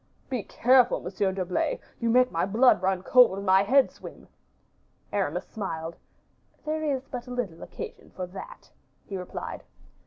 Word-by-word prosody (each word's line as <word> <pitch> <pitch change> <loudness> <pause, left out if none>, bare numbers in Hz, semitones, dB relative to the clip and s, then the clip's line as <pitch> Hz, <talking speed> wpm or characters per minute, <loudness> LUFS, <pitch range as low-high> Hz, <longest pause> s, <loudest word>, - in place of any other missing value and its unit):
"Be 250 -4 0
careful, 250 +3 +3
Monsieur 190 +2 -1
d'Herblay, 185 -1 -1 0.2
you 235 - 0
make 250 +2 +4
my 165 - 0
blood 225 +6 +4
run 190 -1 0
cold, 245 -3 +6
and 200 - -5
my 190 0 +5
head 260 +7 +4
swim." - - -12 0.9
Aramis - - -1
smiled. 165 -6 -5 0.7
"There 310 +1 -1
is 270 -3 -1
but 250 -2 -6
little 245 -10 -4
occasion - - -8
for 185 - -3
that," 335 - -11 0.3
he 195 - -6
replied. 180 -1 -6
205 Hz, 150 wpm, -27 LUFS, 185-250 Hz, 0.9 s, cold